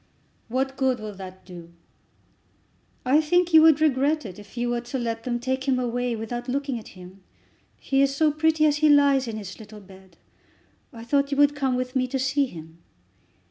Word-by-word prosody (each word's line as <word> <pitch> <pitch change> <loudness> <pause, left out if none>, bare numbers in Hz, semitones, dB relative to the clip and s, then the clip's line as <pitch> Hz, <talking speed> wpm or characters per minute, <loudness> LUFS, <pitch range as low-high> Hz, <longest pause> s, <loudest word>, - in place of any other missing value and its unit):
"What 265 +3 -2
good 260 -2 +1
will 215 -1 -7
that 185 -1 -11
do?" 170 -2 -12 1.3
"I 280 +5 +4
think 350 +2 +1
you 320 - +9
would 315 -2 +6
regret 300 0 +1
it 190 -1 -9
if 205 +3 -15
you 240 0 -1
were 240 0 -1
to 245 +2 -5
let 230 -2 -4
them 240 -1 -2
take 260 +2 -3
him 265 -2 +2
away 245 -1 -2
without 240 +3 -6
looking 270 -1 -2
at 215 - -14
him. 185 +2 -13 0.6
He 270 0 0
is 275 0 +1
so 310 +1 +3
pretty 310 +1 +2
as 295 -1 +2
he 305 0 +3
lays 280 -3 +4
in 220 -1 -5
his 200 -1 -9
little 215 -1 -12
bed. 190 -3 -17 0.7
I 230 -4 -11
thought 280 +3 +1
you 280 - -2
would 290 0 +4
come 265 -3 0
with 255 +1 -4
me 255 -1 +1
to 265 - -3
see 275 +1 0
him." 160 -5 -12
255 Hz, 200 wpm, -24 LUFS, 220-280 Hz, 1.3 s, you